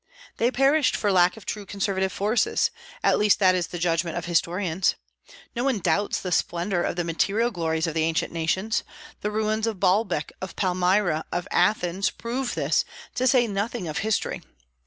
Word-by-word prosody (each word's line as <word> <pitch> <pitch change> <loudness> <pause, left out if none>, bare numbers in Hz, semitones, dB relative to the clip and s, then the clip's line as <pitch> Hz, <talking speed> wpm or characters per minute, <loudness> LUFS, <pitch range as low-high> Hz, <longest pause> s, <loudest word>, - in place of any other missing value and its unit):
They 235 - +2
perished 275 +3 +3
for 205 - +1
lack 180 +1 +4
of 220 - -12
true 210 - -4
conservative 195 -1 -1
forces; 230 - +1 0.3
at - - +3
least 210 -1 +4
that 185 -2 +4
is 180 -2 0
the 180 - -6
judgment 170 -1 0
of - - -4
historians. 175 +1 +1 0.6
Nobody 245 -1 0
doubts 190 +3 0
the 180 - -5
splendor 175 +2 0
of - - -1
the 175 - -1
material 195 +8 0
glories 160 -4 -1
of 165 - -2
the 160 - 0
ancient 160 +1 0
nations. 185 +7 0 0.4
The 210 - -2
ruins 215 +1 0
of 215 -4 -3
Baalbec, 185 -5 +1
of 190 - -6
Palmyra, 180 -3 +1
of 175 +2 -2
Athens, 195 -2 +2
prove 240 0 -4
this, 155 0 +1 0.3
to 255 - +1
say 250 -1 +4
nothing 205 -1 -3
of 155 - -3
history. 220 -1 -1
190 Hz, 175 wpm, -25 LUFS, 175-220 Hz, 0.6 s, lack